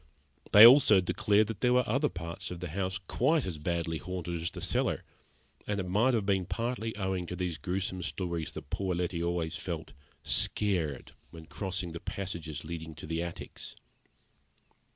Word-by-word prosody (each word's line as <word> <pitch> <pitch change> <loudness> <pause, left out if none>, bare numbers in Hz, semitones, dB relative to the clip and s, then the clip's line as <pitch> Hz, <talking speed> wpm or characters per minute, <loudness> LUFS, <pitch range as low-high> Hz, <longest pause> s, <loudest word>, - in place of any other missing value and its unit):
They 105 +2 +11
also 120 -5 +8
declared 105 +3 +2
that 105 -2 -6
there 125 -1 +4
were 125 0 +4
other 135 +6 +1
parts 85 -1 -6
of 90 - -6
the 90 -1 -5
house 95 +3 -2
quite 135 - +1
as 85 -5 -5
badly 80 0 -2
haunted 90 -2 -4
as 85 - -1
the - - -9
cellar, - - 0 0.6
and 105 -1 -1
it 95 - -3
might 115 +8 +3
have 110 -4 0
been 95 -3 +1
partly 115 -2 -3
owing 95 -3 -2
to 90 - -5
these 90 -3 -3
gruesome 95 +4 -3
stories 85 -3 -3
that - - -9
poor 95 -2 -1
Letty 85 -1 -2
always 85 -2 -1
felt - - -5 0.3
scared, 90 -9 +2 0.2
when 80 -1 -11
crossing 90 +1 -4
the 85 - -6
passages 85 -7 -5
leading 80 -1 -6
to - - -9
the 80 +1 -2
attics. 85 0 -6
90 Hz, 175 wpm, -30 LUFS, 85-105 Hz, 0.6 s, They